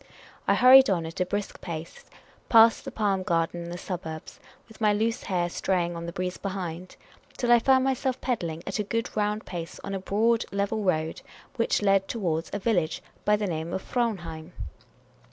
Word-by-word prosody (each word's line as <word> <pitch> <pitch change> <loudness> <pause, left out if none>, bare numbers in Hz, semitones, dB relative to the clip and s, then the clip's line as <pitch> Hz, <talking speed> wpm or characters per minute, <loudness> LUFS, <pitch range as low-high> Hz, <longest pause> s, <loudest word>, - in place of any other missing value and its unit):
I - - +4
hurried 260 0 +8
on 175 -4 +1
at 165 +3 -7
a 180 - +1
brisk 205 +1 -4
pace 165 -2 -7 0.4
past 225 0 +6
the - - -5
Palm 200 -3 0
garden 170 -2 0
and 170 - -7
the 175 - -5
suburbs, 160 -4 -6 0.3
with 225 0 -17
my 210 -1 +4
loose 225 +2 0
hair 175 -2 -1
stray 180 0 0
ing 170 0 -5
on 170 0 -6
the - - -4
breeze 180 +1 -4
behind, 185 -2 -5 0.4
till 240 -1 +1
I 240 - +8
found 260 +2 +4
myself 260 -1 0
pedalling 170 -10 -3
at 195 - -3
a - - +1
good 230 +3 -3
round 210 0 -1
pace 170 -2 -6
on 195 - -5
a 195 - -2
broad, 220 +4 +1
level 200 +2 -1
road, 160 -5 -1 0.4
which 230 -2 +1
led 195 -1 +3
towards 170 -7 -2
a - - -2
village, 190 -6 0 0.2
by 210 - +5
name 170 -5 -2
Fraunheim. 180 -7 -3
195 Hz, 185 wpm, -27 LUFS, 170-220 Hz, 0.4 s, hurried